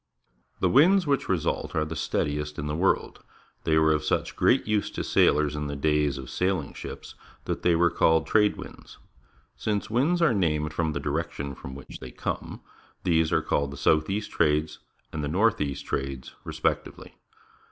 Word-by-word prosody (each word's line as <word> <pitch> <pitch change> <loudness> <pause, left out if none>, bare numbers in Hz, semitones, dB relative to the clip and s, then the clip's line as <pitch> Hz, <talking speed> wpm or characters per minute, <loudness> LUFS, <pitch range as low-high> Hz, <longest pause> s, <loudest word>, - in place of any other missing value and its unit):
The - - +4
winds 180 +8 +5
which 140 -2 0
result 90 -5 -1
are 75 - +1
the 80 +1 -6
steadiest 75 -1 -2
in 75 - -4
the 75 0 -2
world. 95 +4 0 0.4
They 80 -1 +3
were 80 0 +4
of 75 - -1
such - - -1
great - - +3
use 105 -1 0
to - - -4
sailors 75 0 +3
in 75 0 -3
the 70 - -4
days 75 0 +1
of 65 -2 -8
sailing 90 -6 -1
ships - - -8 0.3
that - - -3
they 85 -1 +3
were 85 +1 +3
called 80 0 +3
Trade 105 -1 +3
winds. - - -11 0.6
Since 105 0 -2
winds 145 +10 +2
are 165 -7 +4
named 75 -6 0
from 80 -2 -1
the 70 - -2
direction 70 -1 -3
from 65 0 -9
which 70 - -10
they 65 - -8
come, - - -5 0.4
these 80 -2 +2
are - - +2
called 70 -1 0
the 70 - -8
South 75 +3 +2
east 105 +2 -2
Trades 75 0 +1 0.3
and 75 - -3
the 70 - -2
A'orth 105 +6 +2
east 70 -1 -3
Trades, 65 -1 -4
respec - - 0
tively. - - -12
80 Hz, 185 wpm, -26 LUFS, 75-95 Hz, 0.6 s, winds